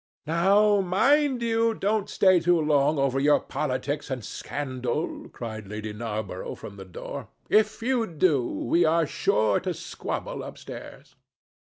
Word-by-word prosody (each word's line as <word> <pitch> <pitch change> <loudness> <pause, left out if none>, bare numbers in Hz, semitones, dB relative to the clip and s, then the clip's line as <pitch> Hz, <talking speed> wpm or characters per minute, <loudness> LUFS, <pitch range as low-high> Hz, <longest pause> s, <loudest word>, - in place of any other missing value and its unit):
"Now, 200 +6 +4
mind 260 +8 +2
you 230 0 +2
don't 210 0 0
stay 185 -2 +4
too 175 0 +3
long 150 -1 +2
over 135 -1 +1
your 145 +2 +4
politics 145 +1 -3
and 130 -4 -4
scandal," 130 +1 -4
cried 110 -3 -7
Lady 105 +1 -5
Narborough 105 -4 -4
from 100 -1 -10
the 95 - -9
door. 90 - -7 0.2
"If 215 +1 +3
you 245 -2 +1
do, 155 - +2
we 165 +8 +1
are 165 0 +3
sure 105 -6 +1
to - - -3
squabble - - -5
upstairs." - - -10
155 Hz, 140 wpm, -26 LUFS, 125-200 Hz, 0.2 s, Now